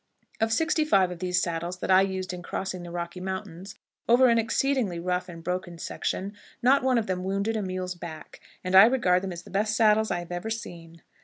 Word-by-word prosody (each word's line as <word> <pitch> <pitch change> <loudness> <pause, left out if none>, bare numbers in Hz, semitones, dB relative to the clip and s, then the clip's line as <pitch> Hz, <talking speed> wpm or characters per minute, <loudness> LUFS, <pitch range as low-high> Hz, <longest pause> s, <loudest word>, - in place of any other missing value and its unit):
Of 225 0 +1
sixty 320 +5 +2
five 195 -11 +3
of 175 - -7
these 180 0 0
saddles 170 +1 -3
that 185 - -2
I 185 0 +7
used 190 -1 -2
in 180 - -6
crossing 185 0 -4
the 175 - -8
Rocky 170 +1 -5
Mountains, 190 0 -6 0.3
over 250 +2 +6
an 230 0 +4
exceedingly 230 -5 0
rough 180 +1 -2
and 165 -1 -10
broken 180 0 -3
section, 195 +4 -4 0.3
not 265 +3 +5
one 260 -1 +2
of 225 - +1
them 185 -2 -2
wounded 200 +4 -1
a 215 - -1
mule's 185 -1 -3
back, 170 -3 -10 0.2
and 185 0 -3
I 190 +3 +10
regard 205 -8 +3
them 190 -1 -4
as 175 0 -7
the - - -14
best 215 +2 0
saddles 220 -1 +4
I 175 - 0
have 175 0 -7
ever 175 +5 -4
seen. 170 -7 -7
185 Hz, 220 wpm, -27 LUFS, 175-220 Hz, 0.3 s, I